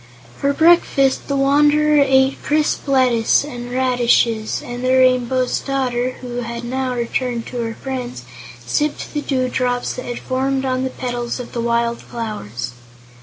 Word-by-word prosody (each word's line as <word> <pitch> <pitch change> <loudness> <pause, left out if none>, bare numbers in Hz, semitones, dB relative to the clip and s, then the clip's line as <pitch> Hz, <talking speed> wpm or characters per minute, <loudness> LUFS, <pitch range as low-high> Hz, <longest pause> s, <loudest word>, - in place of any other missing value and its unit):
For 280 - 0
breakfast 315 -4 +3
the 280 - -1
Wanderer 295 +2 +4
ate 265 0 +2
crisp 300 0 0
lettuce 255 -4 +3
and 245 -4 -7
radishes, 240 -3 +2
and 245 +1 -6
the 255 0 +2
Rainbow's 255 0 +2
Daughter, 255 -2 -1
who 245 -1 -6
had 235 0 -4
now 255 +1 -2
returned 240 0 -2
to 250 - -6
her 225 -1 -4
friends, 250 - -5 0.4
sipped 295 - -2
the 295 - -1
dewdrops 255 -2 -1
that 250 - -5
had 245 - -4
formed 265 +1 -1
on 255 0 0
the 260 - -1
petals 245 -1 -4
of 245 - -7
the 235 - -2
wild 235 0 0
flowers. 125 - -5
255 Hz, 150 wpm, -19 LUFS, 240-270 Hz, 0.4 s, Wanderer